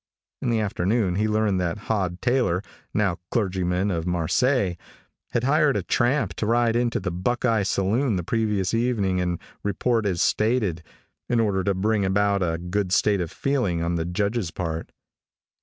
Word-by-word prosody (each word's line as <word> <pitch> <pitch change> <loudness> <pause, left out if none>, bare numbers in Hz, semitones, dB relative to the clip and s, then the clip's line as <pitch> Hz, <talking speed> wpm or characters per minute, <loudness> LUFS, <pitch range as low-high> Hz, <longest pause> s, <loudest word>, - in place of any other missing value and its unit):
In 125 - -1
the 115 -2 +2
afternoon 100 0 0
he 105 +1 +1
learned 105 -3 +1
that 85 +2 -1
Hod 95 -5 -1
Taylor, 120 -8 +1 0.3
now 100 -6 0
clergyman 95 -3 0
to 85 -4 -1
Marseilles, 90 - +1 0.5
had 120 - -1
hired 150 +1 +3
a - - -2
tramp 130 +5 +1
to 105 - -1
ride 115 0 +2
into 120 0 +1
the 90 -2 -3
Buckeye 115 +5 0
saloon 105 +5 +1
the 90 - -2
previous 105 -1 0
evening 110 -6 +1
and 90 -1 -1 0.2
report 110 +2 0
as 90 -3 -1
stated, 105 -6 +1 0.5
in 120 -1 +2
order 100 -4 +1
to 100 0 +1
bring 105 +2 +1
about 100 +1 +2
a 80 -2 0
good 90 +3 -2
state 100 0 +3
of 85 - -3
feeling 120 -12 0
on 85 +1 -1
the 85 -1 0
Judge's 100 +2 -1
part. 80 -2 -4
100 Hz, 165 wpm, -24 LUFS, 90-115 Hz, 0.5 s, hired